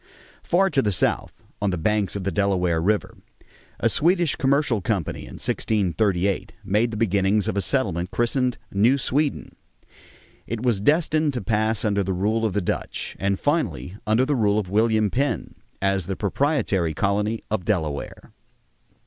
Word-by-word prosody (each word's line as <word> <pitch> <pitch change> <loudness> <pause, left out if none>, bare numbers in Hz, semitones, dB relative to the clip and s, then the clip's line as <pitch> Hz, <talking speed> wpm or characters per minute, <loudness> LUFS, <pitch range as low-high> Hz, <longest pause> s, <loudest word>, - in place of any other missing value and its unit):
Far 195 +2 +2
to 140 - +3
the 105 - 0
south, 90 - -1 0.2
on 100 - +1
the 90 - -1
banks 105 +3 0
of 100 - -3
the 100 - -1
Delaware 90 -5 +1
River, 105 +4 -1 0.6
a - - +2
Swedish 175 -1 +2
commercial 135 -5 +1
company 100 -7 -2
in - - -10
1638 100 -2 0
made 105 +4 +1
the 110 - -5
beginnings 100 -1 +1
of - - -1
a 100 - +1
settlement, 90 -6 0
christened 125 +2 0
New 115 +8 +3
Sweden; 140 +2 -1 0.9
it 115 0 -4
was 115 -6 +1
destined 155 +2 +2
to 125 - -2
pass 110 +2 0
under 100 -2 +1
the 95 0 -2
rule 110 +5 +1
of 100 - -4
the 105 - 0
Dutch, 90 - -4
and 95 0 0
finally 95 - -1
under 110 +4 +3
the 145 - 0
rule 105 -5 +2
of 95 -4 -2
William 110 -1 +2
Penn 140 +3 -1 0.3
as 95 -3 +1
the 95 - -2
proprietary 100 - 0
colony 105 +2 0
of 110 -4 -1
Delaware. 80 -8 -3
105 Hz, 160 wpm, -23 LUFS, 95-125 Hz, 0.9 s, to